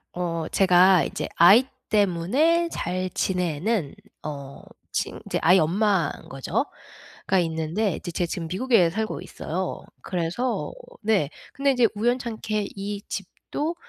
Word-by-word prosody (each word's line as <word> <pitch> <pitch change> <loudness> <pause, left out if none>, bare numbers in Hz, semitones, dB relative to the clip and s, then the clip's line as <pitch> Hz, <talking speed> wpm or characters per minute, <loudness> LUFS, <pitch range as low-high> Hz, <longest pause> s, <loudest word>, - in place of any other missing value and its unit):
어 170 -2 -2
제가 185 -1 +5
이제 - - -4
아이 200 +9 +8 0.2
때문에 215 - +2
잘 185 +1 -2
지내는 180 0 -1 0.3
어 140 -2 -7 0.3
친 - - -2
이제 - - -1
아이 180 +4 +6
엄마인 185 0 +1
거죠 135 0 -1 0.6
가 190 - +3
있는데 165 +4 -1
이제 175 - -6
제가 175 +1 -1
지금 165 0 -4
미국에 190 -2 +3
살고 220 +4 -3
있어요. - - -4 0.2
그래서 180 +8 -2 0.3
네. 210 -10 +2 0.2
근데 275 0 +2
인제 250 -3 +4
우연찮게 220 -2 -1
이 200 0 -4
집도 290 - -4
190 Hz, 250 characters per minute, -25 LUFS, 170-220 Hz, 0.6 s, 아이